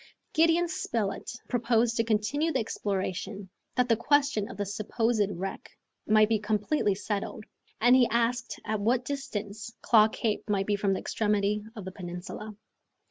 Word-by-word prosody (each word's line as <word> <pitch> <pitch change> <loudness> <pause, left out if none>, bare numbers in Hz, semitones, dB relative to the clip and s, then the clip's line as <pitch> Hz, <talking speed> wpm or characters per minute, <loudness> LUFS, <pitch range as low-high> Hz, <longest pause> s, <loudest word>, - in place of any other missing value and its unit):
Gideon 330 +2 +4
Spilett 230 -10 -2 0.2
proposed 235 -1 +2
to 230 - +3
continue 230 +9 +1
the 270 - +1
exploration, 195 -3 -3 0.3
that 250 -1 +2
the 230 - +4
question 280 -3 +2
of 195 - -9
the 205 - -1
supposed 215 +1 0
wreck 195 +1 -5 0.4
might 215 0 +5
be 220 -1 +1
completely 210 +1 +1
settled, 205 +1 -4 0.3
and 245 +3 +6
he 250 -2 +5
asked 235 +2 0
at 215 -1 -1
what 245 +4 +2
distance 215 -6 -5
Claw 215 -2 +6
Cape 220 -1 -2
might 195 -1 +1
be 205 - +1
from 200 -1 +1
the - - -1
extremity 210 -1 0
of 210 -4 -7
the 190 - -5
peninsula. 185 +4 -7
215 Hz, 155 wpm, -28 LUFS, 205-240 Hz, 0.4 s, and